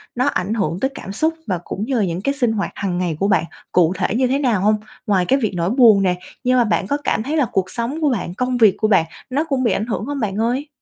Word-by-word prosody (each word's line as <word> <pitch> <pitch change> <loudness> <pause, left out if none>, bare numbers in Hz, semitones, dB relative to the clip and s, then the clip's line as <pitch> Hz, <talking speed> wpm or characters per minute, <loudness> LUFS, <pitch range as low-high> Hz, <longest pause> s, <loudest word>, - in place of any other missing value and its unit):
nó 250 +1 +1
ảnh 205 -7 -1
hưởng 185 -6 -1
tới 265 - +1
cảm 195 - -7
xúc 315 +11 0
và 185 - 0
cũng 205 - -4
như 265 +2 -1
là 220 -4 +2
những 175 0 -3
cái 275 +7 0
sinh 250 -5 +1
hoạt 205 -2 -2
hằng 185 -3 -2
ngày 175 -3 -1
của 195 - +1
bạn 205 - +3 0.3
cụ 175 -1 +3
thể - - -1
như 255 +1 +2
thế 270 +3 +1
nào 240 -9 +1
hông? 210 +2 +3 0.3
Ngoài 190 -3 +2
cái 270 +8 +2
việc 220 -6 -1
nỗi 170 0 0
buồn 225 -4 +6
nè, 180 -1 +2 0.3
nhưng 255 0 +3
mà 245 - +5
bạn 210 -3 0
có 285 - 0
cảm 220 - 0
thấy 295 +6 -2
là 290 - +3
cuộc 190 -1 0
sống 245 +7 -3
của 300 - +3
bạn, 200 -8 -2
công 250 +5 -1
việc 220 -5 +5
của 215 - +1
bạn 195 -6 +4 0.2
nó 275 +4 0
cũng 275 -5 -1
bị 235 - +2
ảnh 210 - -1
hưởng 225 -2 -3
hông 285 +1 -4
bạn 205 -5 -2
ơi? 245 +6 0
220 Hz, 295 wpm, -20 LUFS, 195-255 Hz, 0.3 s, buồn